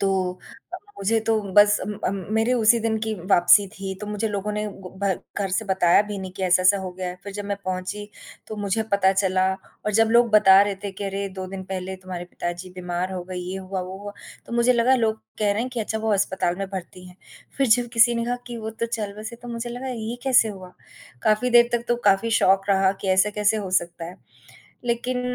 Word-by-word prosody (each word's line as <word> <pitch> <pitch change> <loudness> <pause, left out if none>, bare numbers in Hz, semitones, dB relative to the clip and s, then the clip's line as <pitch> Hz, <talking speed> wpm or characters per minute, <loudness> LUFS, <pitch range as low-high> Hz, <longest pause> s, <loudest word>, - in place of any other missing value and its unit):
तो 190 -2 +1 0.4
अ, - - -2 0.2
मुझे 220 +3 +2
तो 220 0 +1
बस 205 0 +6
अम 210 - -4
अम, 195 -1 -2
मेरे 225 +3 +2
उसी 235 -1 +4
दिन 220 0 0
की 220 0 -2 0.2
वापसी 175 +3 +6
थी, 190 0 -6
तो 210 - -6
मुझे 210 +1 -2
लोगों 205 0 -3
ने 210 0 -2
ब 190 -2 -11
भर 195 -3 0 0.2
घर 200 -1 -1
से 195 +4 0
बताया 190 -1 +4
भी 205 - -4
नहीं 190 -1 -7
कि 190 - -5
ऐसा-ऐसा 185 +2 +4
हो 190 -1 -5
गया 185 0 -5
है, 180 - -6
फिर 200 - -7
जब 205 - -5
मैं 200 0 -2
पहुँची 185 +2 -4 0.4
तो 215 - -6
मुझे 205 +1 -1
पता 195 -1 +4
चला 190 -1 +1 0.4
और 210 - 0
जब 225 +2 +4
लोग 235 0 +5
बता 195 -2 +7
रहे 205 -1 -1
थे 200 - -2
कि, 200 +1 -6
"अरे! 195 0 -3
2 190 -1 -7
दिन 190 -1 -6
पहले 190 0 -5
तुम्हारे 185 -2 -7
पिताजी 175 +1 -6
बीमार 180 +1 -3
हो 180 -1 -4
गए, 185 0 -7
ये 180 +1 -4
हुआ, 190 0 -4
वो 185 +1 -7
हुआ," 205 0 -8 0.3
तो - - -10
मुझे 235 +1 +4
लगा 245 +2 +3
लोग 220 -2 0 0.2
कह 210 -1 +2
रहे 210 - -1
हैं 255 - -4
कि 245 -2 -3
अच्छा 220 0 -2
वो 220 -1 0
अस्पताल 190 -3 0
में 195 +1 -3
भर्ती 180 0 -7
हैं, 180 - -16 0.4
फिर 275 - +2
जब 240 +2 +3
किसी 235 +1 +5
ने 235 0 -1
कहा 245 +1 -1
कि 240 - -6
वो 220 0 -5
तो 230 +1 -3
चल 215 -3 -4
बसे, 220 +2 -7
तो 245 0 -11
मुझे 235 0 -5
लगा 250 +2 -5
ये 230 -1 -4
कैसे 250 -4 +4
हुआ? 185 -3 -9 0.5
काफ़ी 215 +4 +2
देर 240 0 +6
तक 235 0 0
तो 240 - +2
काफ़ी 195 +4 +3
शॉक 195 +1 +3
रहा 190 -1 +3
कि 195 - -3
ऐसा 190 +2 +3
कैसे 210 +1 +1
हो 200 -3 -4
सकता 175 -2 -1
है, 175 +2 -9 0.7
लेकिन 245 +1 -1
200 Hz, 240 wpm, -23 LUFS, 190-225 Hz, 0.7 s, बता